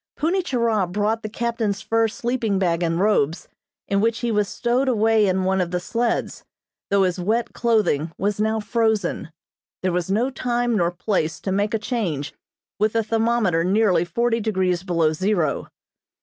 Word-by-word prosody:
Punni 345 +5 +1
Churah 230 - 0
brought 210 +3 0
the 215 - -5
captain's 225 -3 -2
fur 225 0 +2
sleeping 230 -2 -1
bag 175 -3 +1
and 165 0 0
robes, 180 -6 +1 0.4
in 200 0 +1
which 230 +1 0
he 240 -1 0
was 210 -2 +1
stowed 245 +5 0
away 225 -3 +3
in 190 0 +1
one 190 0 +1
of 175 - -1
the 180 0 -1
sleds, 230 +6 -2 0.5
though 200 -1 +3
his 180 -1 0
wet 220 +6 -1
clothing 215 - +1
was 205 +1 -1
now 220 +1 +1
frozen. 220 -6 0 0.5
There 185 - +1
was 175 0 -2
no 230 +7 +1
time 245 -1 -1
nor 170 -4 +2
place 175 -2 -2
to 190 - -3
make 205 +3 0
a - - +2
change, 205 - -3 0.5
with 215 +1 +2
the 225 0 +1
thermometer 225 -6 +1
nearly 190 -2 +3
forty 235 +5 0
degrees 190 -5 0
below 170 -4 +1
zero. 185 -1 0
210 Hz, 170 wpm, -22 LUFS, 180-230 Hz, 0.5 s, away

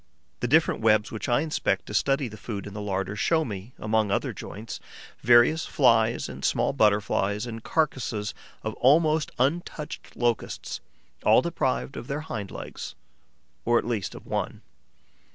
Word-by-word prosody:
The 120 - -1
different 160 +1 +3
webs 110 -1 +3
which 110 - -4
I 120 +2 +3
inspect 160 -1 0
to - - -8
study 135 -1 +2
the 110 - -9
food 105 -1 -6
in 100 - -8
the 105 - -5
larder 95 0 -2
show 160 +8 +2
me, 105 +2 -7
among 110 -1 +1
other 100 - 0
joints, 110 +3 -7 0.4
various 120 +7 +5
Flies 115 -4 +3
and - - -9
small - - +2
Butterflies 105 -2 +2
and 115 -2 -7
carcasses 125 -9 -1 0.3
of 110 - -2
almost 155 +2 +4
untouched 150 +3 -2
Locusts, 120 -1 -1 0.4
all - - +6
deprived 65 +1 -1
of 120 - -7
their 145 +2 -2
hind 110 -10 -5
legs, - - -7 0.7
or 120 0 +3
at - - 0
least 110 -6 -2
of - - -11
one. - - -3
115 Hz, 155 wpm, -26 LUFS, 105-135 Hz, 0.7 s, all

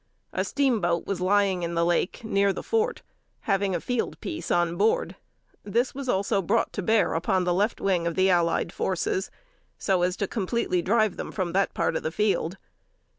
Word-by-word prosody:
A - - 0
steamboat 215 -12 +1
was 190 -3 -3
lying 195 -1 +2
in 170 0 -3
the 170 0 +2
lake, 175 +5 0
near 200 -2 +2
the 190 - -5
fort, 455 +1 0 0.4
having 195 -2 0
a - - 0
field 245 +6 -2
piece 325 -2 -5
on 175 -1 +2
board. 210 +5 +1 0.5
This 235 +5 0
was 275 -1 -5
also 200 -1 +1
brought 215 +5 0
to 205 - -3
bear 220 +3 +2
upon 175 +3 +1
the 175 0 +1
left 205 +5 0
wing 180 -4 +1
of 170 - -2
the 190 0 +3
allied 170 -2 +2
forces, 185 +1 -1 0.5
so 190 -3 +1
as 180 +1 0
to 200 - -1
completely 195 -3 -1
drive 215 +1 +2
them - - -5
from 185 -4 -2
that 195 +1 +1
part - - 0
of - - -1
the 155 - -3
field. 195 -2 0
190 Hz, 190 wpm, -26 LUFS, 175-215 Hz, 0.5 s, the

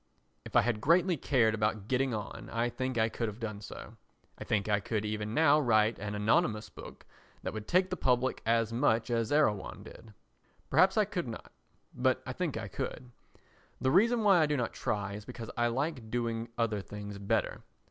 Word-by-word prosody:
If - - -10
I - - +7
had 115 -3 -1
greatly 175 - +4
cared 125 -6 +2
about 105 -1 -1
getting 130 +1 +1
on 110 -2 -5
I 115 +1 0
think 130 0 -3
I 110 0 +3
could 115 0 -3
have 105 +1 -6
done 105 -3 -5
so. - - -10 0.4
I - - -8
think 105 -1 0
I 105 -1 +2
could 110 0 -2
even 105 +1 -3
now 155 -1 +5
write 110 -4 +3
an 105 +1 -4
anonymous 110 +1 +1
book - - -11 0.4
that - - -3
would 110 -1 -6
take 185 +1 +2
the - - 0
public 130 -4 +1
as 115 0 +1
much 120 -1 +1
as 115 -2 0
Erewhon 145 -10 +1
did. 110 -2 -13 0.6
Perhaps 190 +3 +4
I 215 - +4
could 185 -7 -3
not, 115 - -8 0.4
but - - +1
I - - -4
think - - -2
I - - -4
could. 125 -1 -5 0.7
The 130 - +1
reason 225 - +4
why 195 -4 +6
I 155 - +4
do 150 -1 0
not 120 -3 -2
try 100 -1 -2
is 105 +1 -7
because 115 -1 -8
I 120 0 +2
like 125 -1 -2
doing 115 -1 -2
other 110 -3 0
things 105 0 -8
better. 100 - -1
115 Hz, 200 wpm, -31 LUFS, 105-135 Hz, 0.7 s, I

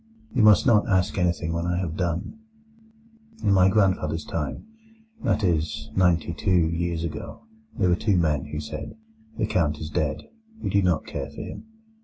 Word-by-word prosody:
You 125 - +2
must 105 -3 +6
not 115 -5 +4
ask 95 0 +2
anything 85 -2 0
when 85 +1 -2
I 90 0 0
have 85 -3 -2
done. 90 - -3 1.0
In 100 - +3
my 95 -1 +5
grandfather's 90 -6 +1
time—that 220 - -5
is, 80 -4 -1
ninety 90 -3 +2
two 90 -3 +2
years 85 -1 -2
ago—there 220 - -4
were 85 - +4
two 100 0 +1
men 75 -5 +1
who 75 +1 -5
said: 75 0 -6 0.4
'The - - +1
Count 75 -4 0
is 75 0 -6
dead; 75 -3 -1 0.4
we - - -3
do 100 - +3
not 90 -4 +1
care - - -5
for - - -8
him. - - -8
90 Hz, 165 wpm, -25 LUFS, 80-105 Hz, 1.0 s, must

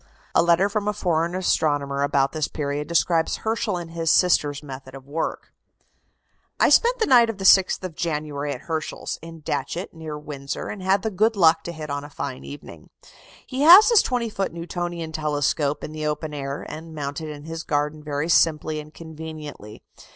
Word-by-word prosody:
A - - +5
letter 170 +3 +4
from 205 0 -2
a 210 - +1
foreign 170 -3 0
astronomer 145 -6 0
about 140 -1 +2
this 155 -2 -1
period 145 0 -3
describes 165 0 +2
Herschel 220 -3 -1
and 170 -1 -7
his 165 -1 -1
sister's 150 -5 +3
method 130 -1 -9
of 135 0 -12
work: 155 +3 -4 1.1
"I - - +5
spent 485 +1 +4
the 450 - +1
night 240 -4 +6
of 225 - -4
the 195 - -6
6th 190 -1 +5
of 185 -3 -5
January 150 -3 -3
at 130 - -6
Herschel's, 160 -1 -4
in 165 0 -10
Datchet, 170 +4 -3
near 160 -2 -7
Windsor, 140 -2 -6
and 205 - -6
had 190 +1 +2
the 220 - -1
good 215 +4 +2
luck 165 -4 +4
to 170 - -4
hit 155 -3 -7
on 145 0 -3
a 145 - -9
fine 140 -2 -6
evening. 145 - -11 0.6
He 260 +1 -4
has 355 +9 +9
his 460 - +7
20 245 -2 -1
foot 195 -2 -2
Newtonian 170 -1 -5
telescope 150 -1 -1
in - - -5
the 155 0 -3
open 150 0 -3
air, 140 0 -5
and 160 +1 -8
mounted 145 +1 -4
in 145 -1 -8
his 165 +1 -6
garden 150 -1 -1
very 150 0 -3
simply 155 -2 +2
and 150 0 -10
conveniently. 155 -9 -9
160 Hz, 190 wpm, -23 LUFS, 145-175 Hz, 1.1 s, has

